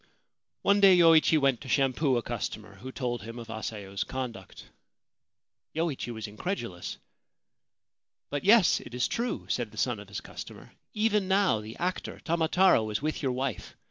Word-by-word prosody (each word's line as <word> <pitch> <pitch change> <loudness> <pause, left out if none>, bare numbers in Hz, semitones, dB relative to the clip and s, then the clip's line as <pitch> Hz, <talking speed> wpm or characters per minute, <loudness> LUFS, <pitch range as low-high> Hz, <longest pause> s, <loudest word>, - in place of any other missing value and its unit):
One 200 +1 +4
day 195 -2 +7
Yoichi 165 -2 +6
went 135 -5 +2
to 140 - -9
shampoo 135 0 +2
a 120 - -2
customer, 105 -3 -5
who 130 +7 -8
told 120 -3 -3
him 115 +2 -8
of 115 -1 -9
Asayo's 105 -3 -4
conduct. 120 -8 -7 1.1
Yoichi 160 -7 -2
was 110 -2 -6
incredulous. 110 - -5 0.6
' - - -62
But 145 - -2
yes: 210 -1 +6
it 120 - -10
is 125 - +1
true/ 240 +1 -2
said - - -1
the - - -16
son - - 0
of - - -11
his - - -5
customer. - - -10 0.2
'Even 210 -2 +2
now 190 - +3
the 110 +1 -9
actor 180 +1 -3
Tamataro 170 - +3
is 105 +6 -2
with 155 0 -2
your 135 -3 0
wife. 130 +1 -4
135 Hz, 165 wpm, -28 LUFS, 115-175 Hz, 1.1 s, day